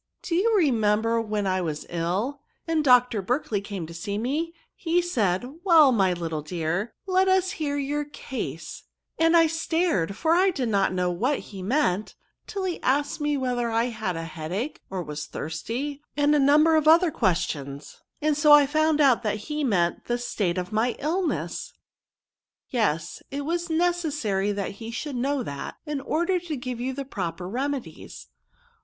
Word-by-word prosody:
Do 340 Hz, -, -3 dB
you 430 Hz, +6 st, +3 dB
remember 230 Hz, -, +2 dB
when 210 Hz, -2 st, -2 dB
I 185 Hz, -1 st, +1 dB
was 155 Hz, -3 st, -3 dB
ill, 190 Hz, +12 st, -2 dB, 0.3 s
and 320 Hz, -2 st, +1 dB
Dr. 250 Hz, -5 st, +4 dB
Berkley 225 Hz, -1 st, -1 dB
came 200 Hz, -4 st, -5 dB
to 165 Hz, -, -10 dB
see 200 Hz, +5 st, -4 dB
me; 290 Hz, +9 st, -1 dB, 0.2 s
he 340 Hz, +1 st, 0 dB
said, 225 Hz, -, 0 dB, 0.2 s
* -, -, -39 dB
Well, 320 Hz, -7 st, +7 dB
my 195 Hz, -6 st, +3 dB
little 165 Hz, -3 st, -3 dB
dear, 175 Hz, +7 st, -3 dB
let 375 Hz, 0 st, +2 dB
us 375 Hz, -1 st, +3 dB
hear 285 Hz, -2 st, -2 dB
your 290 Hz, +1 st, -1 dB
case 280 Hz, -2 st, -6 dB, 0.2 s
;* -, -, -36 dB
and 330 Hz, +1 st, +5 dB
I 330 Hz, -, +6 dB
stared, 325 Hz, -, 0 dB
for 325 Hz, +6 st, +2 dB
I 370 Hz, +3 st, +4 dB
did 265 Hz, -9 st, -2 dB
not 200 Hz, -3 st, +2 dB
know 180 Hz, -1 st, 0 dB
what 245 Hz, +11 st, 0 dB
he 195 Hz, -3 st, -9 dB
meant, 210 Hz, -2 st, 0 dB, 0.3 s
till 395 Hz, -2 st, -4 dB
he 365 Hz, -2 st, -2 dB
asked 285 Hz, +3 st, 0 dB
me 295 Hz, -1 st, +1 dB
whether 245 Hz, -3 st, -1 dB
I 230 Hz, +2 st, +1 dB
had 215 Hz, -6 st, -3 dB
a 165 Hz, -, -4 dB
headach, 175 Hz, -, -4 dB
or 190 Hz, -2 st, -3 dB
was 150 Hz, -1 st, -6 dB
thirsty, 240 Hz, -, -4 dB, 0.2 s
and 290 Hz, 0 st, +4 dB
a 300 Hz, -, +4 dB
number 300 Hz, +4 st, +5 dB
of 310 Hz, -1 st, +2 dB
other 335 Hz, +1 st, +6 dB
questions, 145 Hz, -, -2 dB, 0.2 s
and 305 Hz, -1 st, +3 dB
so 300 Hz, 0 st, +6 dB
I 295 Hz, -1 st, +8 dB
found 310 Hz, +1 st, +2 dB
out 260 Hz, -5 st, +5 dB
that 215 Hz, -3 st, -1 dB, 0.2 s
he 300 Hz, 0 st, -1 dB
meant 180 Hz, -9 st, +1 dB
the 240 Hz, -, 0 dB
state 200 Hz, -7 st, -1 dB
of 180 Hz, +2 st, -3 dB
my 225 Hz, +3 st, +1 dB
illness." 370 Hz, -, -2 dB
'^ -, -, -51 dB, 0.9 s
Yes; 170 Hz, -, -1 dB
it 280 Hz, +1 st, -4 dB
was 340 Hz, +2 st, -2 dB
necessary 310 Hz, -, 0 dB
that 200 Hz, -1 st, -3 dB
he 225 Hz, +3 st, -8 dB
should 265 Hz, +4 st, -4 dB
know 270 Hz, +2 st, 0 dB
that, 140 Hz, -8 st, -6 dB
in 295 Hz, -3 st, -3 dB
order 345 Hz, +6 st, 0 dB
to 330 Hz, -4 st, -5 dB
give 250 Hz, -1 st, -5 dB
you 260 Hz, +1 st, -2 dB
proper 180 Hz, -7 st, -4 dB
re 255 Hz, +8 st, -1 dB
medies. 280 Hz, -3 st, -6 dB
250 Hz, 180 wpm, -25 LUFS, 195-305 Hz, 0.9 s, I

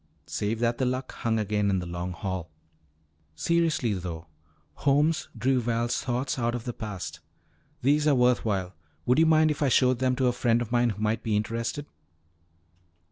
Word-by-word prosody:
Save 105 Hz, +2 st, -2 dB
that 120 Hz, 0 st, +1 dB
the 130 Hz, -, +2 dB
Luck 130 Hz, +1 st, -2 dB
hung 115 Hz, -1 st, -1 dB
again 105 Hz, -1 st, 0 dB
in 95 Hz, -, +2 dB
the 90 Hz, -, -3 dB
Long 85 Hz, +1 st, -4 dB
Hall. 95 Hz, -2 st, -4 dB, 0.9 s
"Seriously, 165 Hz, -, +1 dB
though," 85 Hz, -3 st, -5 dB, 0.5 s
Holmes 145 Hz, +3 st, +2 dB
drew 130 Hz, 0 st, +2 dB
Val's 120 Hz, 0 st, 0 dB
thoughts 125 Hz, +2 st, -2 dB
out 120 Hz, 0 st, 0 dB
of 120 Hz, -, -4 dB
the 120 Hz, -, -4 dB
past, 105 Hz, -5 st, -6 dB, 0.6 s
"these 145 Hz, +3 st, +3 dB
are 145 Hz, -, +5 dB
worth 125 Hz, -1 st, +3 dB
while. 95 Hz, -4 st, -1 dB, 0.3 s
Would 125 Hz, +4 st, +3 dB
you 165 Hz, -, +5 dB
mind 155 Hz, -1 st, +5 dB
if 150 Hz, -, -4 dB
I 140 Hz, -, +3 dB
showed 125 Hz, 0 st, +3 dB
them 130 Hz, -1 st, +2 dB
to 130 Hz, 0 st, 0 dB
a 125 Hz, -, +4 dB
friend 120 Hz, -1 st, +2 dB
of 120 Hz, -1 st, -4 dB
mine 120 Hz, 0 st, +3 dB
who 105 Hz, -1 st, -5 dB
might 110 Hz, +1 st, 0 dB
be 110 Hz, -1 st, -1 dB
interested?" 115 Hz, +7 st, -2 dB
120 Hz, 185 wpm, -27 LUFS, 105-130 Hz, 0.9 s, are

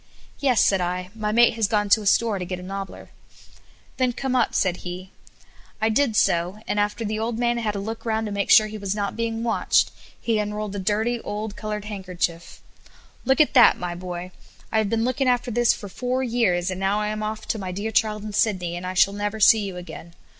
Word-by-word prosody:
"Yes," 260 Hz, -5 st, +3 dB
said 195 Hz, -2 st, +2 dB
I; 180 Hz, +1 st, -3 dB
"my 215 Hz, -2 st, -2 dB
mate 235 Hz, +2 st, +5 dB
has 220 Hz, -2 st, +1 dB
gone 210 Hz, -1 st, +1 dB
to 215 Hz, -, +5 dB
a 205 Hz, -, -4 dB
store 215 Hz, -1 st, +2 dB
to 180 Hz, -, -4 dB
get 180 Hz, +1 st, -4 dB
a -, -, -9 dB
nobbler." 195 Hz, +1 st, -7 dB, 0.9 s
"Then 255 Hz, -2 st, +1 dB
come 260 Hz, +1 st, -2 dB
up," 245 Hz, -, +1 dB
said 180 Hz, -2 st, +1 dB
he. 180 Hz, +1 st, -8 dB, 0.7 s
I 220 Hz, +1 st, +2 dB
did 225 Hz, 0 st, +1 dB
so, 175 Hz, 0 st, +2 dB
and 205 Hz, -, 0 dB
after 210 Hz, +2 st, -1 dB
the 215 Hz, +1 st, -2 dB
old 225 Hz, +1 st, -2 dB
man 240 Hz, 0 st, +1 dB
had 215 Hz, -3 st, -2 dB
a -, -, -2 dB
look 225 Hz, +3 st, -5 dB
round 220 Hz, -1 st, -1 dB
to 210 Hz, -, -4 dB
make 200 Hz, 0 st, -2 dB
sure 215 Hz, -, +7 dB
he 215 Hz, 0 st, -7 dB
was 200 Hz, 0 st, -2 dB
not 200 Hz, -1 st, -2 dB
being 230 Hz, 0 st, -2 dB
watched, 225 Hz, -6 st, +2 dB, 0.3 s
he 225 Hz, -2 st, 0 dB
unrolled 210 Hz, -1 st, -3 dB
a -, -, -3 dB
dirty, 220 Hz, +5 st, 0 dB
old, 210 Hz, 0 st, -5 dB
colored 210 Hz, -1 st, -5 dB
handkerchief. 180 Hz, -4 st, -4 dB, 0.6 s
"Look 265 Hz, +2 st, +3 dB
at 305 Hz, -, +4 dB
that, 245 Hz, -3 st, +7 dB
my 175 Hz, -1 st, -4 dB
boy. 180 Hz, 0 st, -6 dB, 0.4 s
I 220 Hz, -, +2 dB
have 215 Hz, -2 st, 0 dB
been 225 Hz, +1 st, 0 dB
looking 255 Hz, +2 st, 0 dB
after 245 Hz, 0 st, 0 dB
this 240 Hz, 0 st, +3 dB
for 205 Hz, -, -9 dB
four 250 Hz, +6 st, -2 dB
years, 200 Hz, -7 st, +1 dB
and 185 Hz, -, -5 dB
now 195 Hz, +2 st, +1 dB
I 210 Hz, 0 st, -1 dB
am 215 Hz, 0 st, -3 dB
off 215 Hz, 0 st, -4 dB
to 220 Hz, -, -1 dB
my 185 Hz, -2 st, -4 dB
dear 205 Hz, +4 st, -3 dB
child 215 Hz, -1 st, +1 dB
in 215 Hz, -1 st, -6 dB
Sydney, 185 Hz, -5 st, 0 dB
and 180 Hz, +1 st, -5 dB
I 185 Hz, -, -4 dB
shall 195 Hz, +2 st, +4 dB
never 205 Hz, +1 st, -3 dB
see 220 Hz, +1 st, +7 dB
you 190 Hz, -3 st, -5 dB
again. 175 Hz, -1 st, -10 dB
210 Hz, 230 wpm, -24 LUFS, 190-225 Hz, 0.9 s, sure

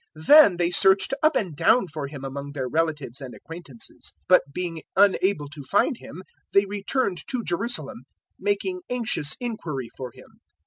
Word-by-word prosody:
Then 290 Hz, -, +8 dB
they 175 Hz, 0 st, +1 dB
searched 190 Hz, +6 st, +4 dB
up 310 Hz, 0 st, +3 dB
and 180 Hz, -8 st, -1 dB
down 195 Hz, -, +3 dB
for 155 Hz, -4 st, -5 dB
Him 140 Hz, -1 st, -8 dB
among 140 Hz, +1 st, -6 dB
their 130 Hz, -3 st, -3 dB
relatives 150 Hz, -3 st, -2 dB
and 130 Hz, -2 st, -8 dB
acquaintances; 165 Hz, -8 st, -10 dB
002:045 -, -, -41 dB
but -, -, +7 dB
being 170 Hz, 0 st, -4 dB
unable 190 Hz, -5 st, +3 dB
to 145 Hz, 0 st, -10 dB
find 205 Hz, -, +1 dB
Him 185 Hz, -4 st, -11 dB, 0.3 s
they 200 Hz, 0 st, +6 dB
returned 200 Hz, 0 st, -2 dB
to 250 Hz, -3 st, -3 dB
Jerusalem, 230 Hz, +8 st, -3 dB, 0.3 s
making 390 Hz, -3 st, -1 dB
anxious 225 Hz, -12 st, -1 dB
inquiry 160 Hz, -, -4 dB
for 130 Hz, -1 st, -6 dB
Him. -, -, -18 dB
175 Hz, 165 wpm, -24 LUFS, 145-220 Hz, 0.3 s, Then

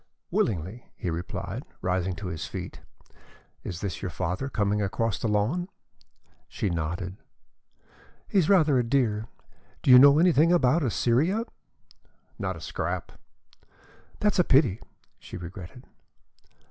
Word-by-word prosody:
"Willingly," 95 Hz, +5 st, -1 dB
he 90 Hz, -, -3 dB
replied, 85 Hz, +2 st, -5 dB, 0.2 s
rising 90 Hz, 0 st, 0 dB
to 100 Hz, -, -8 dB
his 85 Hz, -4 st, -4 dB
feet. -, -, -7 dB, 0.8 s
"Is 90 Hz, -1 st, -6 dB
this 95 Hz, -5 st, -4 dB
your 95 Hz, -, -3 dB
father 90 Hz, -, -3 dB
coming 105 Hz, -3 st, 0 dB
across 100 Hz, +1 st, -1 dB
the 115 Hz, -, -1 dB
lawn?" 115 Hz, -, 0 dB, 0.8 s
She 100 Hz, -, -2 dB
nodded. 85 Hz, +3 st, -3 dB, 1.1 s
"He's 190 Hz, -6 st, +2 dB
rather 155 Hz, -9 st, +5 dB
a -, -, +2 dB
dear. 115 Hz, -4 st, 0 dB, 0.6 s
Do -, -, +4 dB
you 125 Hz, -, +11 dB
know 140 Hz, +2 st, +8 dB
anything 165 Hz, -1 st, +4 dB
about 165 Hz, -2 st, +3 dB
Assyria?" 140 Hz, -, +1 dB, 1.0 s
"Not -, -, -3 dB
a -, -, -11 dB
scrap." -, -, -4 dB, 1.1 s
"That's 210 Hz, -2 st, +1 dB
a -, -, +6 dB
pity," 130 Hz, -, +3 dB, 0.4 s
she -, -, -9 dB
regretted. 90 Hz, +7 st, -9 dB
110 Hz, 125 wpm, -27 LUFS, 90-140 Hz, 1.1 s, you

